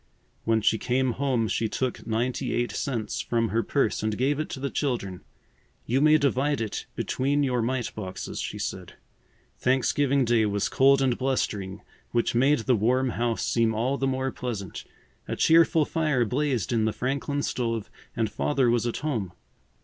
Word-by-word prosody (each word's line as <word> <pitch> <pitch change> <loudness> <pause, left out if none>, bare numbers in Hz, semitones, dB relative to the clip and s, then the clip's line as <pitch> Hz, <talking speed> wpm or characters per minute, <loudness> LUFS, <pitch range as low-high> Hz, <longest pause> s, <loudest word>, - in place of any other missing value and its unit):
When 110 -1 +2
she 110 +1 +2
came 130 +1 +1
home 125 -2 0
she 110 +3 -1
took 130 +2 -3
ninety 120 +3 -1
eight 120 -2 0
cents 115 -3 -2
from 115 -2 0
her 115 +4 +1
purse 135 -2 0
and 110 -1 -1
gave 140 +3 +1
it 155 - -2
to - - -6
the 140 +1 -3
children. 115 -10 -2 0.6
"You 130 +3 +1
may 155 +1 +6
divide 140 0 +1
it 110 -3 -4
between 140 +2 0
your 125 -3 +1
mite 120 +1 -2
boxes," 95 -4 -6
she - - -4
said. - - -5 0.6
Thanksgiving 135 +1 +2
Day 115 -2 +3
was 100 0 0
cold 135 0 +4
and 130 -2 +2
blustering, 105 -8 -2 0.3
which 120 -1 0
made 135 +2 +3
the 125 +3 +2
warm 125 +5 +2
house 120 -1 -1
seem 115 -2 +2
all 125 +5 0
the 135 - +1
more 130 0 -1
pleasant. 110 -8 -5 0.4
A - - -2
cheerful 165 -1 +4
fire 150 -7 +1
blazed 130 0 -1
in 110 -2 +2
the 110 - 0
Franklin 140 +2 -2
stove 115 -4 -2 0.2
and 115 -2 +1
Father 130 +3 +1
was 120 0 +1
at 120 - -2
home. 110 - -2
125 Hz, 170 wpm, -26 LUFS, 115-135 Hz, 0.6 s, may